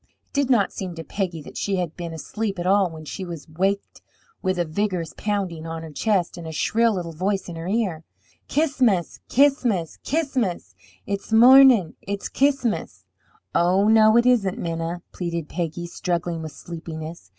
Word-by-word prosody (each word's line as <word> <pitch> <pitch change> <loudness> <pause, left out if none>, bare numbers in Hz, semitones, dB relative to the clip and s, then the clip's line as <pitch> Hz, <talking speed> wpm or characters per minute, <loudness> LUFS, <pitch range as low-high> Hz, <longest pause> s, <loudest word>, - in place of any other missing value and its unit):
It - - -45
did 280 -2 +1
not 225 -7 +3
seem 185 -3 -5
to 165 - -6
Peggy 170 -1 -3
that - - -10
she 200 - -1
had 175 -4 -2
been 170 -2 -5
asleep 195 +6 -4
at 175 - -3
all 195 0 +4
when 160 -1 -10
she 190 - -6
was 170 -4 -7
waked 190 +5 -2 0.4
with 185 -1 0
a 175 - +1
vigorous 180 0 -2
pounding 190 -6 -2
on 165 0 -5
her 160 - -8
chest 180 +3 0
and 165 - -7
a - - -5
shrill 225 +7 +2
little 175 -2 -4
voice 190 +4 -1
in 175 - -7
her 165 +1 -6
ear: 190 -6 -1 0.4
"Ch'is'mus, 255 - +1
Ch'is'mus, 245 - +2
Ch'is'mus! 255 - -1 0.3
It's 200 +2 -4
mornin'! 245 -5 +7
It's 200 0 -5
Ch'is'mus!" 275 -5 0 0.5
"Oh, 185 +4 +3
no, 220 0 +6
it 235 - +4
isn't, 225 -7 +3
Minna!" 165 +1 -3
pleaded 170 -3 -4
Peggy, 170 0 -3
struggling 170 -1 -2
with 160 -1 -6
sleepiness. 160 - -8
185 Hz, 170 wpm, -23 LUFS, 165-215 Hz, 0.5 s, mornin